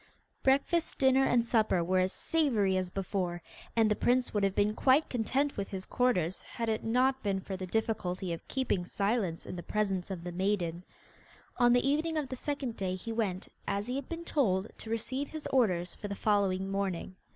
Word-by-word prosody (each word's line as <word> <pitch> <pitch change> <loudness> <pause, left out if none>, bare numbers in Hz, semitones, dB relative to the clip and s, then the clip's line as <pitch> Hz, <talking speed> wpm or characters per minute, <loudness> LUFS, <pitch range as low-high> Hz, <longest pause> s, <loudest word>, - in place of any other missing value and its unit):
Breakfast, 280 +5 +2
dinner, 265 0 +4
and 240 -2 +3
supper 220 -7 +2
were 185 +2 +2
as 185 0 +2
savoury 235 - +1
as 185 -1 0
before, 185 -2 -2 0.4
and 225 -1 +4
the - - +3
prince 250 +3 +2
would 205 -2 +1
have 195 -1 +1
been 205 +1 +2
quite 265 +6 +4
content 265 +4 0
with 200 -1 -3
his 190 -1 -5
quarters 190 -9 +1
had 230 -1 -4
it 220 0 -1
not 255 +3 +2
been 195 -2 0
for 190 0 -5
the 185 0 -5
difficulty 190 -4 -1
of 165 - -8
keeping 260 -9 0
silence 195 -2 -1
in - - -6
the 175 - -5
presence 195 -2 -1
of 185 -3 -5
the 175 - -4
maiden. 180 -2 -1 0.7
On 240 -1 +5
the 245 +2 +3
evening 315 +3 +1
of 290 -4 -2
the 260 - -3
second 265 -3 -3
day 185 -1 -1
he 230 +5 -6
went, 205 -5 -2 0.2
as 200 +1 -1
he 250 +2 -3
had 275 -1 -4
been 335 0 -5
told, 205 - +1
to 220 - -8
receive 260 +5 -2
his 310 -1 -6
orders 180 -9 +2
for 205 - -6
the 200 - -4
following 195 -2 +1
morning. 190 -2 -2
210 Hz, 200 wpm, -31 LUFS, 185-255 Hz, 0.7 s, On